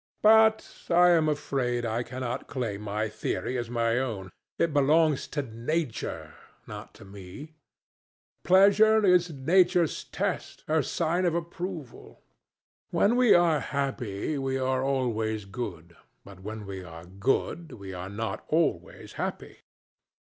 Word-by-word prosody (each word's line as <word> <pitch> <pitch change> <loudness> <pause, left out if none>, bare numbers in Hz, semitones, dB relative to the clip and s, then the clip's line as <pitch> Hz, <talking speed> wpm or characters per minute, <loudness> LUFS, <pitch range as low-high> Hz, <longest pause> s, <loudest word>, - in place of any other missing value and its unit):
"But 220 0 +5 0.2
I 175 +1 +6
am 160 -2 +3
afraid 125 -5 -1
I 115 +1 -1
cannot 125 0 -5
claim 115 -6 -4
my 105 +1 -2
theory 115 +3 -3
as 120 -2 -3
my 115 0 +1
own. 105 -8 -4 0.3
It 170 -3 +1
belongs 150 +1 +3
to 145 -1 -3
Nature, 125 +3 -4 0.3
not - - -10
to - - -14
me. 100 - -11 0.9
Pleasure 205 +3 +5
is 180 -2 +4
Nature's 175 +3 +2
test, - - -4
her 155 0 +2
sign 170 +5 -1
of 170 -2 +1
approval. 170 -4 -6 0.7
When 225 +4 +2
we 250 -3 +6
are 170 -3 +4
happy, 140 -2 -3
we 135 0 -1
are 130 0 0
always 110 -6 -1
good, 90 -5 -7 0.3
but 100 -2 -13
when 105 +2 -7
we 95 -1 -7
are 85 -1 -11
good, 125 - -2
we 95 -2 -9
are 90 +1 -6
not 110 +3 -4
always 155 - -1
happy." - - -5
130 Hz, 135 wpm, -27 LUFS, 110-170 Hz, 0.9 s, I